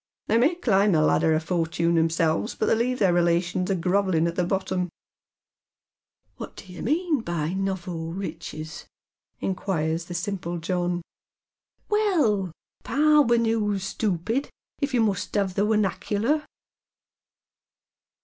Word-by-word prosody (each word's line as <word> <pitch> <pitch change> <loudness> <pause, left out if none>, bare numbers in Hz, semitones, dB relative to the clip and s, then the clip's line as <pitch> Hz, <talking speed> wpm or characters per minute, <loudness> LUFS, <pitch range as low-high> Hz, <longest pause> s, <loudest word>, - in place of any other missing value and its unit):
" - - -68
They 225 - +4
may 290 +8 +3
climb 205 - +3
the 155 - +4
ladder 160 +1 +3
of 155 - -1
fortune 170 0 0
theirselves, 165 +3 +1
but - - +1
they - - +3
leave 245 +3 +1
their 190 -6 +3
relations 175 +1 +1
a 195 - +2
grovellin' 185 -1 +1
at 170 - -3
tho 180 -1 0
bottom." 185 -1 -1 0.7
" - - -50
What - - -8
do 185 - -11
you 180 - -8
mean 315 +3 +1
by 170 -6 -2
nowo 185 -4 -3
riches? 155 -4 -6 0.3
" - - -55
inquires 170 -4 -1
the 175 - -7
eimpl" 175 -2 -3
John. 175 +1 -1
^' - - -6 0.9
Well, 310 - +2 0.3
parwennoos, 230 -9 +3
stoopid, 210 - -1 0.3
if 280 -1 -1
you 245 -3 +2
must 210 -1 0
'av 195 -2 0
the 200 +3 +1
wemackerler." 210 - 0
190 Hz, 140 wpm, -25 LUFS, 170-225 Hz, 0.9 s, They